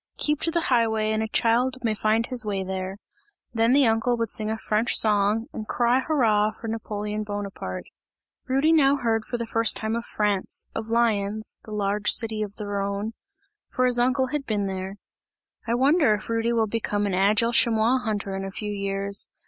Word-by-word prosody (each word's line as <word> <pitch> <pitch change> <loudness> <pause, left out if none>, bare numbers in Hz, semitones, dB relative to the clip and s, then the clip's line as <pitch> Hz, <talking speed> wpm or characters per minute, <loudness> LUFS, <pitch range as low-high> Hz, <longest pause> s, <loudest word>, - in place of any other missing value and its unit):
Keep 300 -1 +1
to - - +2
the 340 +1 0
highway, 220 -2 +2
and 220 0 0
a 220 - -1
child 240 +4 +1
may 225 -2 +1
find 215 +2 +1
his 250 -2 -2
way 200 -2 -2
there!" 190 +1 -4 0.6
Then 230 +1 +3
the 275 +1 +5
uncle 230 +2 +1
would 230 -2 -1
sing 215 -1 -1
a 220 - -2
French 220 +2 +1
song 210 +1 +2
and 215 - -6
cry 245 +1 +2
hurrah 230 -7 +2
for 220 +1 -9
Napoleon 210 -1 -4
Bonaparte. 200 - -5 0.6
Rudy 270 +4 +2
now 285 -4 +5
heard 225 -4 -1
for 240 - -3
the 235 - -3
first 225 0 +1
time 220 +1 -2
of 235 - -3
France, 205 -4 -1
of 220 0 -4
Lyons 220 -2 0
the 215 - -10
large 205 0 -1
city 220 -2 +2
of 205 -1 -4
the 210 - -6
Rhone 200 +2 -3 0.6
for 255 - 0
his 245 -1 +3
uncle 260 +1 +2
had 295 -1 -3
been 210 -2 0
there. 190 0 -4 0.7
"I 230 - +1
wonder 270 -2 +4
if 210 - -9
Rudy 230 +1 0
will 230 -2 +2
become 205 -1 -2
an 200 - -1
agile 210 +5 +2
chamois 235 +2 +3
hunter 205 -5 -3
in 195 - -4
a 195 - -4
few 210 +2 -5
years? 200 0 -1
220 Hz, 195 wpm, -25 LUFS, 205-235 Hz, 0.7 s, the